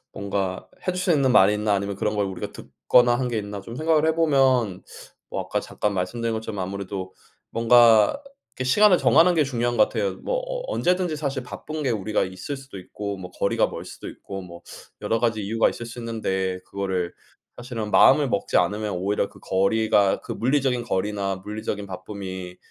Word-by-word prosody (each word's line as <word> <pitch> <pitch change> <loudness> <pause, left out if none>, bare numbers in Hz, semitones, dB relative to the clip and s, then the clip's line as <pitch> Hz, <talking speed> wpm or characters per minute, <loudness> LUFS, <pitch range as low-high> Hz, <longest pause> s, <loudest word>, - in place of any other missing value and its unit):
뭔가 100 -2 -3 0.2
해 185 - +1
줄 180 - -4
수 180 -1 +2
있는 140 -3 +3
말 95 -4 +6
있나? 105 0 +1
아니면 100 0 -2
그런 105 +2 -1
걸 100 -1 +1
우리가 95 -2 -6
듣거나 120 -1 +2
한 125 -1 -1
게 115 - -1
있나?' 100 -1 -5
좀 115 +4 -9
생각을 155 +1 +2
해 160 - +2
보면 130 - +2 0.5
어 - - -2
아까 - - -2
잠깐 105 -1 -2
말씀드린 110 +5 -2
것처럼 110 -2 -5
아무래도 95 0 -5 0.4
뭔가 115 - +5 0.4
이렇게 130 - -3
시간을 205 +4 +6
정하는 170 +4 +5
게 155 - +4
중요한 120 -3 -1
것 105 - +7
같아요. 100 -5 -2
뭐 - - -3
어 - - -4
언제든지 180 -2 +1
사실 140 -3 -3
바쁜 155 +4 -6
게 130 - +1
우리가 110 -1 0
있을 95 +10 -6
수도 135 -7 -10
있고 100 +2 -6
뭐 90 -1 -8
거리가 - - +1
멀 - - -7
수도 - - -9
있고 95 -1 -8
뭐 85 -1 -11 0.4
여러 115 - 0
가지 115 -2 +1
이유가 110 +3 +2
있을 120 - -6
수 115 +1 -9
있는데 95 -5 -2
그거를 95 -3 -3 0.4
사실은 120 -3 -5
마음을 145 -2 +6
먹지 100 - 0
않으면 105 +4 +1
오히려 100 +2 0
그 - - -17
거리가 100 +1 +2
그 - - -6
물리적인 130 -1 +1
거리나 100 -2 -1
물리적인 105 -1 -4
바쁨이 95 -2 -7
110 Hz, 390 characters per minute, -24 LUFS, 100-130 Hz, 0.5 s, 것